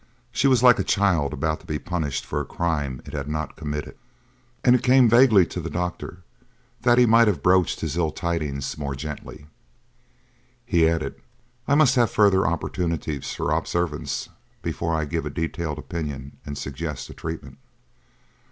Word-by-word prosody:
She 125 +4 +2
was 130 -3 +4
like 125 -2 +7
a - - +2
child 90 -9 +2
about 80 +1 -1
to - - -19
be 75 - -2
punished 80 -5 -3
for 75 - -2
a - - -3
crime 75 -6 -2
it - - -10
has 70 -2 -4
not 75 +1 -3
committed, 75 -1 -5 0.7
and 125 - +6
it 125 - +1
came 130 -1 +5
vaguely 115 -5 +6
to - - -6
the - - -5
doctor 90 0 -4 0.6
that 120 0 +4
he 125 - +7
might 115 0 +5
have 105 - 0
broached 90 -1 +3
his - - -2
ill 85 -3 +2
tidings 75 -5 -3
more 70 -2 -3
gently. 75 0 -8 1.2
He 80 -2 +3
added: 80 -1 -3 0.5
"I 140 - +3
must 145 -4 +5
have 120 -3 +4
further 95 -4 +4
opportunities 85 -3 -2
for - - -2
observance 85 -4 -2 0.3
before 80 -1 -2
I 80 -1 0
give 80 +1 -3
a - - -3
detailed 80 -1 -3
opinion 75 -4 -6
and 70 -1 -5
suggest 75 +2 -5
a - - -9
treatment." 70 -5 -7
80 Hz, 170 wpm, -24 LUFS, 75-95 Hz, 1.2 s, like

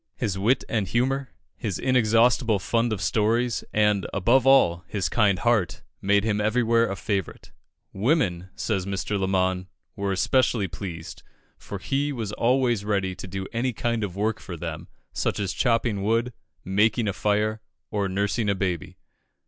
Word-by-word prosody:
His 105 -6 -2
wit 110 +7 +2
and 110 -4 -1
humour, 130 +6 0 0.3
his 105 -7 -3
inexhaustible 120 -2 +3
fund 115 +5 0
of 100 -5 -2
stories, 115 +3 +1
and, 105 -3 +2
above 120 +7 +3
all, 85 -11 +5
his 100 -3 -1
kind 105 -5 +2
heart, 110 -5 0 0.2
made 100 +1 +3
him 105 -1 0
everywhere 115 +1 +2
a 95 - -2
favourite. 100 -2 -4 0.4
Women, 95 - 0
says 95 -4 -2
Mr. 100 +1 -2
Lamon, 95 -1 0 0.3
were 100 -1 -2
especially 110 +1 +2
pleased, 85 -2 -7 0.4
for 100 - -7
he 140 +8 -1
was 115 -6 -4
always 120 -1 +1
ready 100 -3 0
to 95 - -8
do 95 +1 -5
any 120 +2 0
kind 115 0 -1
of 95 -3 -4
work 110 +2 -1
for 90 -3 -8
them, 80 -1 -6 0.3
such - - -1
as 100 -2 -2
chopping 115 -4 +1
wood, 115 +4 0 0.3
making 105 +4 +2
a 100 - 0
fire, 105 +2 0 0.3
or 100 -2 -1
nursing 100 +3 0
a 100 - +2
baby. 90 -4 -3
105 Hz, 155 wpm, -25 LUFS, 95-115 Hz, 0.4 s, all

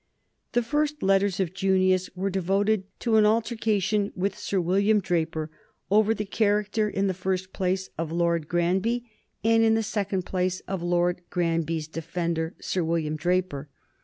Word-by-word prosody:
The 240 0 +2
first 300 +4 0
few 190 - -2
letters 195 -1 +3
of 185 -2 -1
Junius 185 -1 +2
were 195 +2 -1
devoted 195 +2 +1 0.2
to 225 -2 +3
an 215 - +6
altercation 215 -2 +1
with 195 +2 -1
Sir 195 - -2
William 200 +5 +3
Draper 160 -4 -1 0.4
over 215 +2 +4
the 210 - -3
character 210 +1 +1
in 200 -1 -1
the 190 - +1
first 185 0 -3
place 185 0 -1
of 165 -1 -2
Lord 170 -2 0
Granby 190 +9 0 0.4
and 225 0 +4
in 225 0 +4
the 225 - +1
second 200 -3 -2
place 185 0 -1
of 190 -2 -4
Lord 175 +1 +1
Granby's 165 -2 -1
defender, 165 0 -3
Sir 185 - -1
William 160 -2 -1
Draper. 175 -3 -1
190 Hz, 160 wpm, -26 LUFS, 175-210 Hz, 0.4 s, an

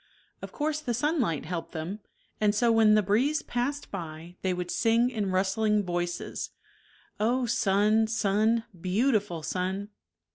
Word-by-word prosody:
Of - - -7
course 305 0 -1
the 245 -6 -2
sunlight 250 - 0
helped 165 0 -5
them, 170 +6 -4 0.4
and 210 -1 +2
so 235 +2 +3
when 220 -2 +5
the 215 - +4
breeze 250 +11 +1
passed 265 +4 -3
by 165 -2 -7
they 190 - 0
would 180 -1 -3
sing 230 +2 +2
in 210 -5 -2
rustling 205 +3 +1
voices 175 -1 -3 0.4
*' - - -31 0.3
Oh 245 +4 +1
sun, 215 0 +3
sun, 220 +1 +2 0.3
beautiful 205 - +1
sun 190 +4 -2
210 Hz, 145 wpm, -28 LUFS, 185-235 Hz, 0.4 s, when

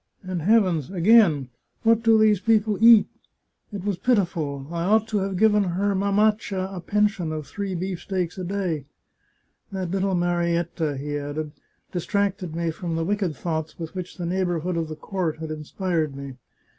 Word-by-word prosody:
And 185 -2 -3
heavens, 185 - +3
again! 180 - +4 0.3
What 230 0 +4
do 225 -1 +5
those 215 -2 +4
people 215 0 +2
eat? 230 -2 +8 0.7
It 200 -3 -6
was 200 -4 -1
pitiful! 170 - 0
I 170 -1 -2
ought 215 +4 +3
to 210 - +1
have 195 -1 -2
given 210 0 +4
her 195 +3 0
mamaccia 200 -1 +1
a - - -4
pen 210 +4 +2
sion 195 -6 -2
of 155 -2 -4
three 195 +5 -4
beefsteaks 185 0 -3
a - - -3
day.... 180 -6 -2 0.9
That 190 -3 -3
little 195 0 0
Marietta," 170 -3 0
he 145 +2 -3
added, 145 +1 -4 0.2
" - - -44
distracted 190 -2 -1
me 170 -1 -1
from 165 0 -4
the 165 0 -1
wicked 195 -4 -1
thoughts 160 0 -4
with 165 -2 -6
which 185 -1 -6
the 175 - -4
neighbourhood 175 -1 -1
of 165 -1 -1
the 155 - -6
court 175 -1 -3
had 160 0 -6
irtspired 155 -1 -2
me. 140 -1 -7
180 Hz, 170 wpm, -24 LUFS, 160-200 Hz, 0.9 s, eat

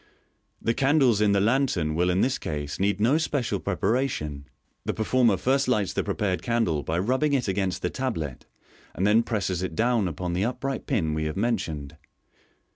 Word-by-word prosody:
The 115 - 0
candles 135 -5 +3
in 105 -1 +4
the 100 - +3
lantern 105 - +1
will 90 +3 +1
in 90 +2 +2
this 130 +1 +1
case 75 -2 -4
need 100 +1 +1
no 125 +9 +3
special 125 -10 -1
preparation. 90 - -1 0.4
The - - -2
performer 110 -1 +2
first 135 +5 +1
lights 105 -6 +1
the - - 0
prepared 95 -3 -1
candle 115 -11 0
by 80 +3 -2
rubbing 130 +10 +1
it 130 -5 +1
against 95 -1 -1
the 90 - 0
tablet, 80 - -4 0.5
and 95 - 0
then 105 +3 +5
presses 100 -6 -2
it 95 -3 -4
down 115 -1 +2
upon 90 +2 -3
the 90 +3 0
upright 130 +3 -3
pin 90 - 0
we 80 0 -1
have 75 +2 -3
mentioned. 80 -10 -2
100 Hz, 180 wpm, -26 LUFS, 90-125 Hz, 0.5 s, then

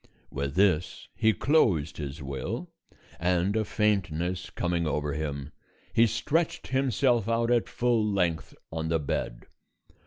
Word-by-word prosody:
With 70 +1 -3
this 90 -3 +1
he 110 -1 +3
closed 100 - +2
his 70 0 -6
will, 65 -1 -4 0.5
and 90 +3 +1
a 110 - +2
faintness 95 -4 0
coming 85 -2 -1
over 75 -1 -1
him, 70 -1 -4 0.4
he 115 +1 +5
stretched 160 +9 -1
himself 125 -3 +2
out 115 +1 +1
at 120 -2 +2
full 120 -2 +1
length 90 -6 0 0.2
on 80 0 -3
the 80 - +3
bed. 70 -5 -3
90 Hz, 130 wpm, -28 LUFS, 75-115 Hz, 0.5 s, he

